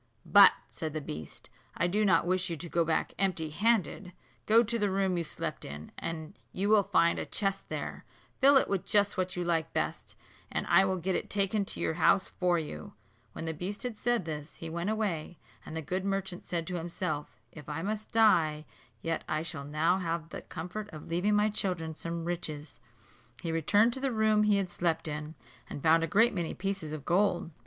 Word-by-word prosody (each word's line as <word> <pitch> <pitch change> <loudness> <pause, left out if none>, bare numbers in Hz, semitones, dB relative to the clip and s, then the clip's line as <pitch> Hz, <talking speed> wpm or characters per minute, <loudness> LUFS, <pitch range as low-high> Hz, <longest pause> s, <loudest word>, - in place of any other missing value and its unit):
"But," - - +8 0.2
said 155 -2 -4
the 155 - -2
beast, 80 - -8 0.3
"I 170 - +2
do 205 +5 +1
not 185 -5 +4
wish 185 +1 0
you 165 - -3
to 170 - -6
go 170 0 +1
back 160 0 0
empty 170 -5 0
handed. 205 -2 +1 0.3
Go 225 +2 +6
to 230 +1 -1
the 205 -1 +2
room 190 -1 +1
you 170 - 0
slept - - -5
in, 75 +2 -8
and 160 +1 -5 0.2
you 200 +2 -1
will 215 -1 +6
find 170 -3 +2
a - - -3
chest 195 -2 -2
there; - - -5 0.4
fill 275 +1 +7
it - - +3
with 195 -3 -1
just 205 -1 +3
what 185 -2 -1
you 180 - -1
like 165 -3 0
best, - - -3 0.4
and - - -2
I 175 +3 +5
will 190 -1 0
get 185 +2 -1
it - - -2
taken 200 0 +1
to - - -3
your - - 0
own - - -8
house 190 - +4
for 180 -1 +1
you," 115 - -6 0.4
When - - -6
the 160 - -2
beast 185 - -5
had 245 -3 -3
said 240 -3 0
this, 150 -1 -6
he 165 -1 -7
went 170 +4 -2
away; 190 -7 -2 0.3
and - - -8
the 160 - -3
good 185 +5 -2
merchant 195 -2 -3
said 170 -2 -2
to 180 0 -3
himself, 165 -3 -4
"If 150 -1 -11
I 155 +2 -3
must 215 +2 -3
die, 160 -9 +4 0.4
yet 165 -1 -1
I 155 0 0
shall 160 -4 -5
now 160 +5 +1
have 165 -2 -3
the - - -7
comfort 185 +6 -6
of 155 -5 -10
leaving 180 +5 +1
my 210 +1 +3
children 180 -6 -1
some 165 +1 -5
riches," 155 -4 -4 0.6
He 165 - -2
returned 205 +9 +3
to 265 - -4
the 270 0 0
room 220 -1 +3
he 210 -1 +4
had 190 -3 -2
slept 165 -2 0
in, 150 +1 -5 0.3
and 145 - -7
found 165 +1 +5
a - - 0
great 225 +5 +4
many 175 -4 -3
pieces 195 -5 -3
of 155 -2 -6
gold. 180 -2 +1
175 Hz, 215 wpm, -30 LUFS, 160-200 Hz, 0.6 s, But